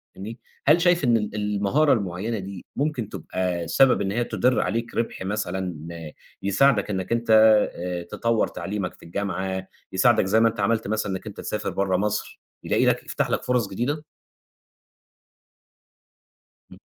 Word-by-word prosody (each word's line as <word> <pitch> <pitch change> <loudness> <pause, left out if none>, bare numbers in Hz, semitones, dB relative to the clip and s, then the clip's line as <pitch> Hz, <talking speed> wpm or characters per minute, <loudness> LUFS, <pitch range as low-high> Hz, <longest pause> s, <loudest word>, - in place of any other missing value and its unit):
فاهمني، 110 +5 -8 0.3
هل 155 +4 +6
شايف 175 -2 +3
إن 120 -3 +4
ال 105 -1 -3
المهارة 105 +8 +2
المعيّنة 100 +2 -2
دي 95 -1 -8
ممكن 140 -7 -1
تبقى 90 -4 -3
سبب 130 +9 +4
إن 95 -1 -1
هي 120 +4 0
تُدِر 120 +2 +1
عليك 115 +1 -2
ربح 115 - -2
مثلًا 95 -2 -2 0.7
يساعدَك 100 +3 +3
إنَّك 95 -1 -3
أنت 115 0 0 0.5
آآ، 90 0 -4
تطوّر 115 +6 0
تعليمَك 100 -2 -4
في - - -19
الجامعة 95 +1 -3 0.2
يساعدَك 110 +2 +4
زَي 105 +4 +3
ما 115 0 +5
أنت 115 -1 -9
عملت 110 +2 +1
مثلًا 105 -1 -1
إنَّك 95 +3 -5
أنت 105 - -8
تسافر 105 - -3
برّا 95 -2 0
مصر، 105 +2 -2 0.2
يلاقي - - +2
لَك - - +2
يفتح - - -1
لك - - -1
فُرص 125 -4 +1
جديدة؟ 140 +9 -2 2.7
إمم. - - -13
105 Hz, 150 wpm, -24 LUFS, 95-115 Hz, 2.7 s, هل